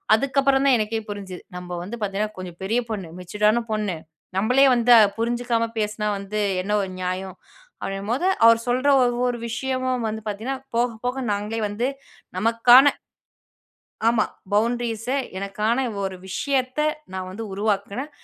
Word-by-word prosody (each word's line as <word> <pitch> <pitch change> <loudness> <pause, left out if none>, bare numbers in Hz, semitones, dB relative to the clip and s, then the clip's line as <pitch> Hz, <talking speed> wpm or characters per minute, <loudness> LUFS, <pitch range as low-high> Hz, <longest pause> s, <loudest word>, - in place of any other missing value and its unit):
அதுக்கப்புறம் 270 +2 +2
தான் 270 -2 +6
எனக்கே 220 +1 -1
புரிஞ்சுது. 195 -3 -6 0.2
"நம்ப 180 0 -8
வந்து 210 +6 -6
பார்த்தீங்கன்னா, 210 +1 -2
கொஞ்சம் 180 -2 -8
பெரிய 220 +5 +1
பொண்ணு. 195 -7 -4
மெச்சுர்டான 210 +5 +1
பொண்ணு. 210 -5 -1 0.4
நம்பளே 250 +7 +4
வந்து 240 0 +3
அ - - +8 0.2
புரிஞ்சுக்காம 235 0 0
பேசினா 210 0 -1
வந்து 200 +2 -3 0.2
என்ன 210 - -4
ஒரு 190 - -5
நியாயம்?" 185 +1 -4 0.4
அப்படீங்கும்போது 215 - -2 0.2
அவர் 230 0 +7
சொல்ற 255 +3 +1 0.2
ஒவ்வொரு 245 0 0
விஷயமும் 255 0 -1
வந்து 220 0 -5
பார்த்தீங்கன்னா, 220 +6 -3 0.2
போக 240 +1 +3 0.2
போக 255 +2 -1
நாங்களே 210 +2 -3
வந்து 230 +5 -1 0.5
நமக்கான 240 +6 +6 1.2
ஆமா. 230 -2 +3 0.3
பவுண்ட்ரீஸ 230 +1 0 0.3
எனக்கான 210 +4 -1 0.2
ஒரு 190 -1 -3
விஷயத்த 260 +5 -1 0.3
நான் 185 -1 -4
வந்து 215 +4 -6
உருவாக்குனேன். 205 +7 -2
220 Hz, 135 wpm, -23 LUFS, 200-245 Hz, 1.2 s, அ